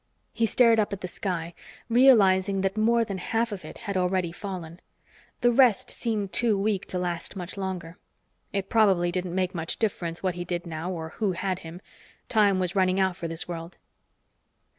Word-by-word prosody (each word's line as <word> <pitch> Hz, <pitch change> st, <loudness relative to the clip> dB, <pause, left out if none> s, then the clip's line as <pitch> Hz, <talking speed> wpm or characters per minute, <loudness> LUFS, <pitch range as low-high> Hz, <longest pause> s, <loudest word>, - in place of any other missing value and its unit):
He 230 Hz, 0 st, +1 dB
stared 230 Hz, -1 st, +4 dB
up 210 Hz, -, +1 dB
at 195 Hz, -, -5 dB
the 180 Hz, -, -3 dB
sky, 175 Hz, -2 st, -4 dB, 0.3 s
realizing 200 Hz, -6 st, +5 dB
that 195 Hz, +1 st, 0 dB
more 230 Hz, +2 st, +3 dB
than 195 Hz, -3 st, -5 dB
half 230 Hz, +5 st, -1 dB
of 200 Hz, -2 st, -6 dB
it -, -, -9 dB
had 200 Hz, -2 st, -5 dB
already 180 Hz, -1 st, +1 dB
fallen. 175 Hz, -2 st, -7 dB, 0.6 s
The 240 Hz, 0 st, +4 dB
rest 240 Hz, -4 st, +4 dB
seemed 215 Hz, -5 st, -2 dB
too 230 Hz, -4 st, +2 dB
weak 200 Hz, -1 st, -1 dB
to 185 Hz, -, -3 dB
last 175 Hz, +1 st, -2 dB
much 180 Hz, -2 st, -6 dB
longer. 185 Hz, -3 st, -5 dB, 0.5 s
It 195 Hz, -1 st, -2 dB
probably 195 Hz, -6 st, +3 dB
didn't 180 Hz, 0 st, -3 dB
make 185 Hz, 0 st, 0 dB
much 165 Hz, -2 st, -3 dB
difference 175 Hz, -6 st, -2 dB
what 185 Hz, -1 st, +1 dB
he 175 Hz, 0 st, -5 dB
did 175 Hz, 0 st, -3 dB
now 165 Hz, +1 st, -4 dB
or 160 Hz, -3 st, -5 dB
who 200 Hz, +2 st, -1 dB
had 185 Hz, +1 st, -2 dB
him; 170 Hz, +1 st, -10 dB, 0.5 s
time 205 Hz, -5 st, +4 dB
was 185 Hz, +1 st, -1 dB
running 185 Hz, 0 st, +2 dB
out 190 Hz, -2 st, +2 dB
for 170 Hz, -, -5 dB
this 165 Hz, 0 st, -3 dB
world. 170 Hz, 0 st, -7 dB
190 Hz, 185 wpm, -26 LUFS, 175-210 Hz, 0.6 s, realizing